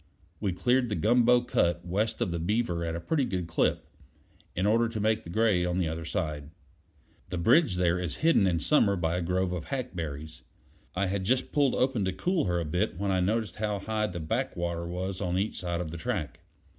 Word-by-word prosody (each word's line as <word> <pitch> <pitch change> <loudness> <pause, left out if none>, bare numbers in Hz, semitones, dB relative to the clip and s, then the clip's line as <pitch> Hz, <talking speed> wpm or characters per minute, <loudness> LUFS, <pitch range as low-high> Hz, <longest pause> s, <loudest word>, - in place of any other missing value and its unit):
We 100 -3 0
cleared 125 +7 +1
the 105 - -1
gumbo 120 +3 +4
cut 85 -7 0
west 100 +5 -1
of - - 0
the 85 - -2
Beaver 90 -1 0
at 85 0 -2
a - - -3
pretty 145 - 0
good 90 -8 -2
clip, 80 - 0 0.7
in 90 - 0
order 115 +2 +3
to 110 -1 -4
make 110 +1 +1
the - - -10
grade 95 -2 +2
on 90 0 -1
the 90 -3 +1
other 80 +1 -4
side. 75 -2 -3 0.8
The 90 - -3
bridge 115 - +4
there 90 0 +2
is 90 -4 -2
hidden 160 -12 +5
in 85 -2 +1
summer 105 - +3
by 85 -1 0
a - - -1
grove 90 +2 0
of 90 -3 -4
hackberries. 80 - -5 0.5
I 100 +2 +1
had 95 +1 -1
just 125 +7 0
pulled 140 -3 +2
open 130 -5 +1
to 95 - -1
cool 180 - 0
her 90 -2 0
a 85 - -2
bit 90 +4 -1
when 100 +1 -1
I 95 - +2
noticed 105 +1 0
how 105 -1 -1
high 105 +2 -1
the 90 -3 -5
back 80 -1 -2
water 85 0 -2
was 90 +2 -4
on 90 0 0
each 100 +3 -1
side 85 -1 -2
of 80 -3 -5
the 85 - -6
track. 75 -2 -3
95 Hz, 220 wpm, -28 LUFS, 85-110 Hz, 0.8 s, hidden